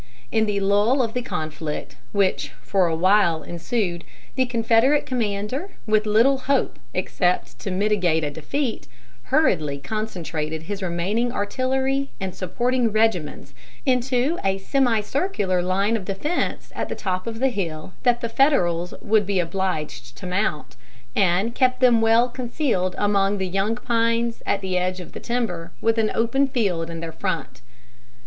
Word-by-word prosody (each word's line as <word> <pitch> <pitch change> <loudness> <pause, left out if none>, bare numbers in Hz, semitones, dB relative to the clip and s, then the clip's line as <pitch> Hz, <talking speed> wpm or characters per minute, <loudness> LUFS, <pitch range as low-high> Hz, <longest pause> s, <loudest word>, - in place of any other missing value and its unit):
In 220 -1 +2
the 205 -1 0
lull 205 +7 +3
of 225 -2 -3
the 250 - -1
conflict 155 - -4 0.2
which 185 -8 +1
for 190 -3 +2
a 165 - 0
while 175 -2 +3
ensued, 175 0 -2 0.3
the 260 -1 +1
Confederate 235 +4 +3
commander, 245 - -2
with 215 -1 +2
little 235 +6 +4
hope 275 +1 0
except 180 -1 -1
to - - -4
mitigate 185 -4 +1
a 145 - -1
defeat, 220 - -3 0.4
hurriedly 155 - +2
concentrated 160 -4 -4
his 200 +4 -5
remaining 190 +7 0
artillery 265 +5 0
and 190 -2 -3
supporting 240 +6 0
regiments 210 -8 0 0.3
into 260 +4 +1
a 195 0 +1
semicircular 225 - +1
line 195 +5 +1
of 205 -5 -3
defense 245 - -2
at - - -3
the - - -3
top 185 0 -3
of 225 -1 -4
the 265 +3 +2
hill 175 -6 -4
that 245 -2 +2
the 235 - -1
Federals 175 - +3
would 210 -2 +2
be 200 -2 +1
obliged 165 -8 -3
to - - -9
mount, 180 - -1 0.4
and 195 +4 +2
kept 255 -1 +2
them 245 -3 +5
well 225 +2 +5
concealed 240 - -1
among 205 -1 +2
the 190 -1 -1
young 195 +4 0
pines 230 -1 0
at 200 - +1
the 185 -1 0
edge 185 +1 -1
of 180 - -9
the - - -8
timber, 185 -9 -2
with 225 0 +2
an 215 -1 +2
open 255 +5 +2
field 195 - -1
in 165 -1 -6
their 165 -1 -5
front. 160 -7 -4
205 Hz, 155 wpm, -23 LUFS, 180-240 Hz, 0.4 s, them